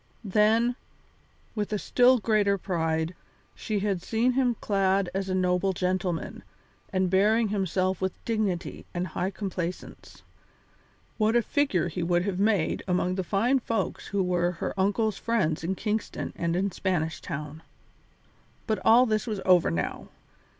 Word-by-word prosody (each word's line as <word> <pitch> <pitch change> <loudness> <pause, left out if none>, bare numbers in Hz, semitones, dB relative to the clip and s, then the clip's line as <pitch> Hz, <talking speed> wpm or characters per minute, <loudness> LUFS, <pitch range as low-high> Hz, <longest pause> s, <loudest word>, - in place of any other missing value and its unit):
Then, 220 +4 +3 0.8
with 210 -2 -3
a 210 - +1
still 250 +5 +4
greater 210 -3 +2
pride, 165 -3 -1 0.4
she 210 -2 -3
had 195 -3 -1
seen 230 +6 +1
him 250 -2 +1
clad 195 -2 +1
as 195 0 -2
a 185 - 0
noble 185 +1 +1
gentleman 180 -2 -2 0.5
and 185 -1 +1
bearing 210 +4 +3
himself 190 -2 0
with 190 -1 0
dignity 210 -6 -2
and 175 +1 -1
high 180 +4 -2
complacence. 185 -3 -6 1.0
What 220 +2 +2
a 240 - +4
figure 240 - +1
he 175 +1 -4
would 175 +1 +1
have 190 -1 -2
made 205 -5 +1
among 180 0 +1
the 190 0 -2
fine 225 +10 +2
folks 230 -2 -3
who 200 -1 0
were 175 -1 +1
her 165 - -4
uncle's 205 +2 0
friends 190 -10 0
in 185 +4 -1
Kingston 215 +2 -3
and 170 0 -1
in 195 +2 0
Spanish 170 -4 -2
Town! 150 -1 -6 1.0
But 220 -2 0
all 240 +3 +6
this 215 0 -1
was 215 -3 -2
over 180 -3 +5
now. 80 -1 -3
190 Hz, 150 wpm, -27 LUFS, 180-215 Hz, 1.0 s, all